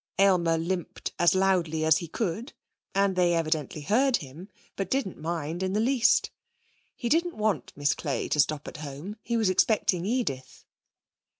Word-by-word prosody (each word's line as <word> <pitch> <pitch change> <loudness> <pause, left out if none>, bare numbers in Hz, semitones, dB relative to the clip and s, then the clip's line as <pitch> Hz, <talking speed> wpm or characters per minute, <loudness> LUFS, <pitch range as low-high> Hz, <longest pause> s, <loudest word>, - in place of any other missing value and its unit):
Aylmer 180 -4 +4
limped 175 +2 -3
as 175 +1 +4
loudly 175 -5 +1
as 160 - +5
he 170 - -6
could, 220 - -3 0.4
and 195 -1 +2
they 175 -1 +3
evidently 155 -2 -1
heard 245 - +3
him, 155 +8 -11 0.3
but 195 -2 -3
didn't 260 - -2
mind 165 +1 -3
in 190 0 -1
the 210 - +1
least. 240 0 +3 0.6
He 240 - -4
didn't 335 +6 +1
want 210 - -1
Miss 145 0 +1
Clay 145 -4 -3
to 150 - 0
stop 150 0 +1
at - - -7
home. 150 +8 -7
He 235 0 -1
was 215 -4 +2
expecting 185 -2 +2
Edith. 215 - -3
180 Hz, 165 wpm, -27 LUFS, 160-215 Hz, 0.6 s, as